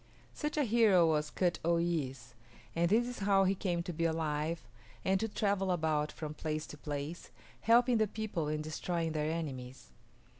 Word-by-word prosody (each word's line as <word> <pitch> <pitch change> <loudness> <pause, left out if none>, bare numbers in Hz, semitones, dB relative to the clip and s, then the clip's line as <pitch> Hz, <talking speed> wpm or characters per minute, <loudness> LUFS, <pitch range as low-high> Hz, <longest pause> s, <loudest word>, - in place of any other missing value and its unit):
Such 300 0 -3
a 295 - +3
hero 215 -7 +5
was 150 -2 +1
K[)u]t 175 -2 0
o 170 +1 +3
y[)i]s´, 135 -7 -2 0.4
and 170 0 +2
this 225 +4 +4
is 245 - -6
how 195 -1 +4
he 190 0 +3
came 175 -3 -1
to 175 0 -5
be 165 - -2
alive 160 -2 -1 0.4
and 190 0 +3
to 225 - 0
travel 200 -2 0
about 155 -3 0
from 155 -1 -6
place 155 0 -3
to - - -7
place, 145 +3 -5 0.3
helping 240 +1 +4
the 215 - +3
people 205 -7 -3
and 150 0 -2
destroying 165 +1 -2
their 155 0 -1
enemies. 130 - -5
170 Hz, 180 wpm, -33 LUFS, 155-195 Hz, 0.4 s, hero